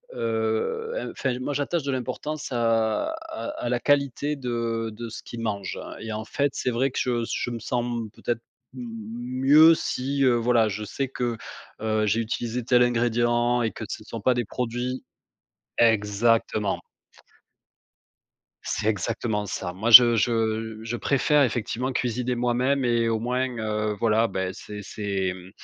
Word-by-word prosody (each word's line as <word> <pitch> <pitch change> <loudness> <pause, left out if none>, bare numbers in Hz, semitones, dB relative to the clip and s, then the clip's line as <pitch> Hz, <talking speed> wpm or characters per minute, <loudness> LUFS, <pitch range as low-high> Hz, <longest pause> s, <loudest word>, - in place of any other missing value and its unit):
heu, 115 - -2
enfin, 130 -2 -2
moi 145 - -2
j'attache 145 +3 -1
de 140 - -1
l'importance 130 +3 -4
à 115 - +1 0.2
à 325 - -6 0.2
à 120 - 0
la 125 - +1
qualité 145 +1 +1
de 115 -3 -2
de 115 +1 -7
ce 110 - -8
qu'ils 115 -1 -7
mangent, 100 -4 -3
hein, - - -9
et 110 -1 -5
en 110 +1 -4
fait, 140 +5 0
c'est 125 - -1
vrai 130 +4 +1
que 125 - -4
je 120 -2 0
s - - -6
je - - -2
me 115 - -4
sens 120 +2 -1 0.3
peut-être 120 -1 -3 0.4
m 125 -2 -6 0.6
mieux 155 +4 +8
si, 135 -1 -1
heu, 125 - +5
voilà, 115 -1 +3
je 105 +1 -4
sais 135 +6 -3
que, 120 -3 -3 0.4
heu, 110 -1 +1
j'ai 110 +3 +2
utilisé 120 +1 -3
tel 125 +1 +4
ingrédient 120 0 +2
et 115 - +1
que - - -8
ce - - -5
ne 110 - -14
sont 115 - -6
pas 130 +5 +3
des 120 -2 -1
produits 125 +2 -3 0.8
exactement. 110 -1 +2 1.8
C'est 105 - -2
exactement 105 +1 -1
ça. 90 -2 -4
Moi, 110 +5 -2
je 120 0 +11
je 110 0 0
je 115 +1 -3
préfère 145 +4 +2
effectivement 125 +1 -1
cuisiner 125 0 -1
moi-même 125 +3 +1
et 115 -1 +2
au 110 -1 0
moins, 125 +3 0
heu, 110 -1 -1
voilà, 115 +1 +3
beh, 95 -2 -2
c'est 105 0 -8
c'est, 100 -3 -2
mmh, 90 0 -12
120 Hz, 165 wpm, -25 LUFS, 110-125 Hz, 1.8 s, je